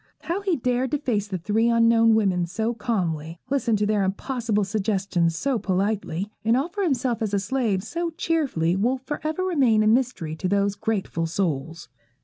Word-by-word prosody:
How 340 +6 -2
he 385 -4 +1
dared 250 -1 0
to - - +3
face 220 -7 -1
the 190 -2 -3
three 215 +6 +1
unknown 230 -1 +5
women 185 -5 +1
so 220 +6 -1
calmly, 170 -8 -2
listen 260 -5 +2
to 210 0 +1
their 210 -1 +1
impossible 215 +2 -1
suggestions 190 -4 0
so 265 +4 0
politely, 195 -1 -1
and 225 +3 +3
offer 345 +9 -2
himself 255 - 0
as 210 -2 0
a - - +2
slave 205 -2 -1
so 340 +9 -3
cheerfully, 295 - 0
will 240 +7 +1
for 265 +3 -6
ever 315 +4 -1
remain 265 -12 +3
a - - +2
mystery 220 -9 +1
to 185 - -2
those 200 0 +2
grateful 200 -5 -2
souls. 165 -2 -2
220 Hz, 175 wpm, -24 LUFS, 190-255 Hz, -, unknown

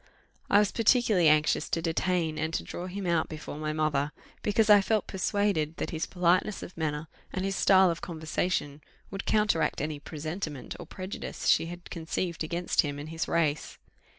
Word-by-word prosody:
I - - +6
was 210 -1 +4
particularly 220 -7 +4
anxious 150 0 +2
to - - 0
detain, 165 -1 0
and 160 +1 -1
to - - -1
draw 180 - -6
him 195 +1 -5
out 170 -2 +1
before 155 -1 -7
my 155 0 -2
mother, 155 -2 0 0.3
because 210 +1 +2
I 205 -1 +8
felt 215 +1 +1
persuaded 190 -5 0
that - - -3
his 160 -2 -2
politeness 180 +3 +1
of 180 - -9
manner, 155 -1 -2 0.2
and 190 0 -2
his 195 0 -1
style 190 -2 +5
of 165 - -5
conversation, 160 -2 -2 0.3
would 195 0 -5
counteract 210 -6 +2
any 150 0 -3
presentiment 155 -1 -5
or 175 - -8
prejudice 185 +2 -6
she 165 - +4
had 175 0 -9
conceived 170 0 -3
against 170 +2 +1
him 145 -3 -4
and 145 +2 -7
his 165 0 -3
race. 155 -3 0
170 Hz, 180 wpm, -29 LUFS, 155-190 Hz, 0.3 s, I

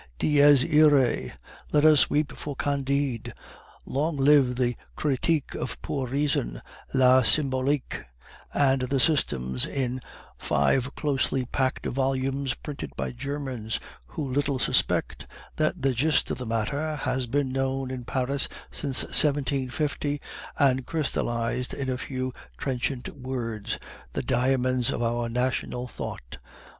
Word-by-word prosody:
Dies 145 - +6
iroe! 150 -5 +4 0.4
Let 150 0 +4
us 155 -3 +6
weep 150 0 0
for 145 -2 -6
Candide. 140 -3 -1 0.5
Long 150 +3 -1
live 135 -2 +4
the 125 -1 0 0.2
Kritik 150 +1 0
of - - -5
Pure 135 -3 -2
Reason, 135 - 0 0.3
La 130 -1 +5
Symbolique, 135 +1 +1 0.5
and 135 -2 +2
the 130 +2 0
systems 65 - +2
in 130 -2 -2 0.4
five 120 - +1
closely 135 -3 0
packed 130 +1 -1
volumes, 135 0 -1
printed 145 -2 -7
by - - -3
Germans, 130 -4 -4 0.3
who 140 - -5
little 140 +1 0
suspect 125 - +1 0.3
that 155 -3 0
the 135 -1 +3
gist 150 +6 +2
of - - -3
the 125 - -5
matter 140 +8 -1
has 130 -2 -2
been 135 +1 0
known 135 0 -1
in 130 -1 -5
Paris 130 +3 -1 0.2
since 135 -3 +3
1750, 145 0 +1 0.4
and 130 -2 +3
crystallized 125 -5 -1
in 130 -2 -2
a 125 - -2
few 130 -1 -4 0.2
trenchant 130 -1 -2
words 120 -5 -4 0.4
the - - -2
diamonds 130 0 +1
of - - -1
our 120 0 -1
national 125 0 -2
thought. - - -7
130 Hz, 125 wpm, -26 LUFS, 125-145 Hz, 0.5 s, Dies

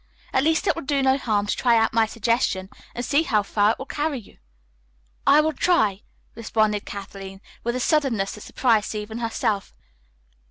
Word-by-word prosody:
At 265 - +3
least 320 +5 +2
it - - +3
will 330 - -6
do 275 -1 0
no 265 0 +4
harm 215 -6 0
to 205 - -1
try 240 -2 +3
out 225 0 +2
my 225 -1 +3
suggestion 220 -4 0 0.3
and 245 - -3
see 290 +2 +3
how 215 -10 +1
far 205 +2 +2
it - - -10
will 265 - -7
carry 295 0 -2
you." 230 - -14 0.9
"I 295 +2 +7
will 315 +1 0
try," 220 - +2 0.3
responded 215 -2 0
Kathleen 195 -1 -8 0.2
with 235 +1 -1
a - - -1
suddenness 255 -9 +1
that 210 - -10
surprised 225 -3 +1
even 215 +2 -5
herself. 220 -3 -2
230 Hz, 185 wpm, -23 LUFS, 210-270 Hz, 0.9 s, I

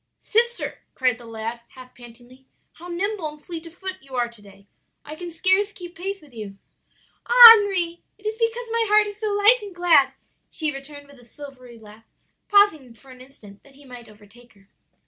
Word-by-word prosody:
"'Sister,' 475 +2 -1 0.2
cried 250 -3 0
the 235 - -14
lad 225 +1 -6
half 255 -1 -14
pantingly, 245 +2 -17 0.2
'how 345 - -14
nimble 370 0 -3
and 300 0 -13
fleet 335 -2 -8
of 330 - -15
foot 375 0 -6
you 270 -1 -12
are 240 -1 0
to 235 -2 -18
day! 195 -1 -18 0.4
I 300 - -9
can 350 +2 -8
scarce 375 +5 +1
keep 350 -3 -11
pace 390 +1 -6
with 285 -4 -20
you.' 210 -3 -9 0.7
"'Ah, 480 -1 +11
Henri, 380 -6 +1 0.2
it 415 - -24
is 430 - -2
because 460 +1 -2
my 460 0 0
heart 420 +1 +4
is 410 0 -9
so 435 - -3
light 415 +4 +3
and 400 -3 -10
glad!' 335 -6 +3 0.4
she 310 -2 -3
returned 285 +1 -11
with 280 -2 -19
a - - -18
silvery 255 -2 -13
laugh, 220 0 -17 0.4
pausing 320 - +2
for 265 +3 -18
an 255 0 -15
instant 215 -7 -16
that 275 -1 -22
he 285 +1 -19
might 245 -3 -12
overtake 215 +3 -20
her. 200 -1 -27
295 Hz, 200 wpm, -22 LUFS, 245-395 Hz, 0.7 s, Ah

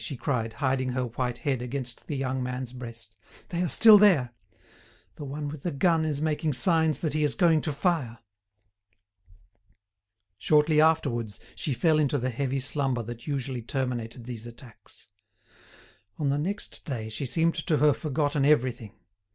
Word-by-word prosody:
she 140 - -5
cried, 115 -5 -2
hiding 130 +1 -1
her 130 0 -1
white 125 +1 -3
head 140 -6 -2
against 125 -1 -5
the 145 - -3
young 130 -1 -2
man's 125 0 -4
breast. 115 -3 -9 0.3
"They 175 0 -2
are 180 - 0
still 220 -2 +8
there. 165 -13 +4 0.8
The - - -9
one 145 +2 -5
with 145 0 -7
the 175 - -2
gun 160 +2 +2
is 150 -2 -1
making 155 -1 0
signs 160 +4 +3
that 155 -3 -1
he 155 0 0
is 145 -6 +1
going 165 0 +3
to 155 - -2
fire." 145 -6 -1 2.2
Shortly 150 +4 +3
afterwards 125 -9 +1
she 140 - -3
fell 155 +3 +3
into 145 -1 +1
the 130 0 -2
heavy 135 +2 -2
slumber 135 -3 0
that 120 +3 -9
usually 135 -3 -3
terminated 120 -2 -4
these 120 -1 -7
attacks. 120 -1 -14 1.1
On 145 -2 0
the 140 +1 0
next 200 +7 -4
day, 120 -7 -5
she 110 +5 -4
seemed 165 +6 +2
to 155 -1 0
have 150 -1 +4
forgotten 145 -1 -1
everything. 125 -7 +1
135 Hz, 160 wpm, -27 LUFS, 125-155 Hz, 2.2 s, still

